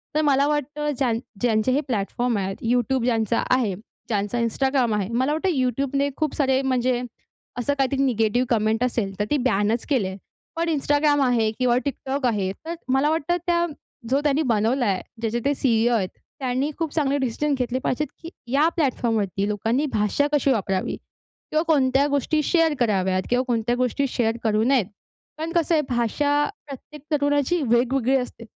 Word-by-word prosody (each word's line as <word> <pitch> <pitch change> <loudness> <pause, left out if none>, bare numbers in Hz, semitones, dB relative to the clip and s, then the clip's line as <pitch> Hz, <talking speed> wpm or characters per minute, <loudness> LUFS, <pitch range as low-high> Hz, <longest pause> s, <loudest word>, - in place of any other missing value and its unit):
तर 310 - +3
मला 275 +2 +3
वाटतं 295 0 -1
ज्यां 255 -4 +1 0.3
ज्यांचे 225 0 +2
हे 285 +3 +2
प्लॅटफॉर्म 235 +1 -1
आहेत, 195 0 -2 0.2
YouTube 250 +1 +1
ज्यांचा 230 -1 +1
आहे, 230 -7 0 0.3
ज्यांचा 210 +2 -1
Instagram 250 0 +1
आहे. 200 0 -2
मला 260 +5 +1
वाटतं 370 +5 0
YouTubeने 275 +1 0
खूप 310 -3 -1
सारे 265 -2 +2
म्हणजे 255 -2 +1 0.6
असं 285 +4 0
काहीतरी 275 0 +1
निगेटिव्ह 240 -1 +1
कमेंट 220 +2 +1
असेल, 230 -6 -1
तर 205 - +1
ते 295 - +3
बॅनच 210 +2 +1
केली 250 -10 +2
आहे. 190 - -6 0.4
पण 335 0 -1
Instagram 290 -1 +2
आहे 230 -3 +2
किंवा 245 -1 +3
TikTok 275 0 -3
आहे. 200 -4 -1
तर 330 - -4
अ, - - -3 0.2
मला 280 +3 +3
वाटतं 325 +2 0
त्या 345 0 +2 0.4
जो 275 +2 +2
त्यांनी 290 +1 +2
बनवला 235 +4 +1
आहे, 195 -2 0 0.2
ज्याचे 230 +1 -1
ते 285 - +3
सी-ई-ओ 240 -2 +2
आहेत, 190 -4 0 0.3
त्यांनी 265 +3 -1
खूप 320 -3 -2
चांगले 285 -3 +1
डिसिजन 280 +3 -1
घेतले 250 0 -1
पाहिजेत, 265 +3 -1
की 330 - -7 0.2
या 295 +3 +4
प्लॅटफॉर्मवरती 225 - 0
लोकांनी 225 +8 0
भाषा 210 +7 +1
कशी 280 -1 +3
वापरावी 195 -5 -1 0.5
किंवा 310 +1 +2
कोणत्या 275 -3 +3
गोष्टी 285 +2 +1
शेअर 330 -2 +3
कराव्यात 190 -5 +1
किंवा 250 +1 +2
कोणत्या 240 0 0
गोष्टी 255 +2 0
शेअर 230 -1 0
करू 215 -1 +2
नयेत. 250 -4 +3 0.5
कारण 320 +1 -4
कसं 335 -1 +1
आहे 305 - +3
भाषा 285 +5 +1 0.2
प्रत्येक 290 +2 -10
तरुणाची 290 +3 +1
वेगवेगळी 250 +2 +2
असते 250 -2 -6
255 Hz, 170 wpm, -23 LUFS, 225-285 Hz, 0.6 s, या